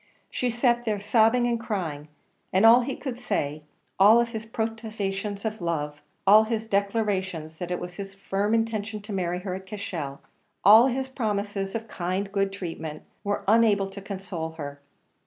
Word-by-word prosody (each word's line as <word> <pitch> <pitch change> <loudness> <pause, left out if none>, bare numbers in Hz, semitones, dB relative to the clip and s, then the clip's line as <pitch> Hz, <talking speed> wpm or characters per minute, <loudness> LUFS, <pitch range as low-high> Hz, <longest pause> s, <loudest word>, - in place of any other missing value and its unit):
She 250 - 0
sat 240 0 +2
there 215 -3 -1
sobbing 225 +4 +3
and 235 -1 +1
crying, 175 -10 -3 0.4
and 190 +4 +4
all 235 +2 +8
he 265 +2 -3
could 255 -4 -5
say 150 - -2 0.4
all 220 +5 +7
his 225 -1 -6
protestations 215 -3 -3
of 220 -2 -3
love 150 -3 -2 0.2
all 210 +3 +7
his 225 0 -2
declarations 195 -6 -1
that 175 0 -5
it 180 - -2
was 180 0 -6
his 195 -1 -7
firm 200 +2 0
intention 220 -2 -2
to 210 0 -6
marry 180 -1 -1
her 185 -1 -4
at 190 +1 -7
Cashel 170 -9 -5 0.5
all 220 +5 +9
his 265 +1 -1
promises 205 -6 -2
of 230 0 -4
kind 185 0 -2
and 195 - -14
good 195 -1 +1
treatment, 165 -5 -6 0.2
were 205 0 -1
unable 205 -3 +4
to 200 - -8
console 185 -5 -5
her. 145 -3 -7
200 Hz, 170 wpm, -26 LUFS, 185-225 Hz, 0.5 s, all